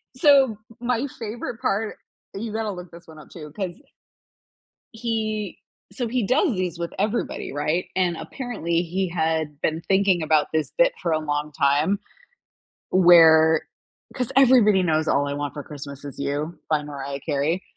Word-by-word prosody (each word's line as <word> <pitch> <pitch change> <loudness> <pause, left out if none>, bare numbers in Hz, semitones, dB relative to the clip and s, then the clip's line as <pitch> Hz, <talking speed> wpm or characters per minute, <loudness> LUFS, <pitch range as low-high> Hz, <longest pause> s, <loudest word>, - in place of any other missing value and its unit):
so, 280 0 +6
m 220 -4 -6 0.2
my 245 +2 0
favorite 230 0 -5
part 215 +2 -1 0.4
you 215 +2 -5
gotta 220 -1 -2
look 180 -2 -8
this 170 0 -14
one 155 -1 -13
up, 150 - -14
too, 150 -3 -10
'cause 185 0 -4 1.2
he 220 -2 -3 0.3
so 245 -3 -3
he 235 -2 -1
does 270 - +2
these 180 -3 -3
with 170 0 -3
everybody, 210 - -2
right? 155 +5 -1
And, 180 -2 +1
apparently, 170 - -2
he 180 +2 -2
had 160 -3 -1
been 160 +1 0
thinking 195 -3 +3
about 155 -1 +2
this 155 -1 0
bit - - +4
for 170 - 0
a 155 - +2
long 150 -1 -2
time, 145 +8 +2 0.9
where 160 -3 +6 0.5
'cause 250 -3 -2
everybody 235 -7 +6
knows 160 -2 +1
"All 145 0 +2
I 140 - -3
Want 145 -1 -3
for 145 - -6
Christmas 140 -1 -9
Is 140 -3 -8
You" 145 +4 -3
by 150 -1 +2
Mariah 140 -1 -6
Carey. 155 +4 -1
170 Hz, 160 wpm, -23 LUFS, 155-215 Hz, 1.2 s, so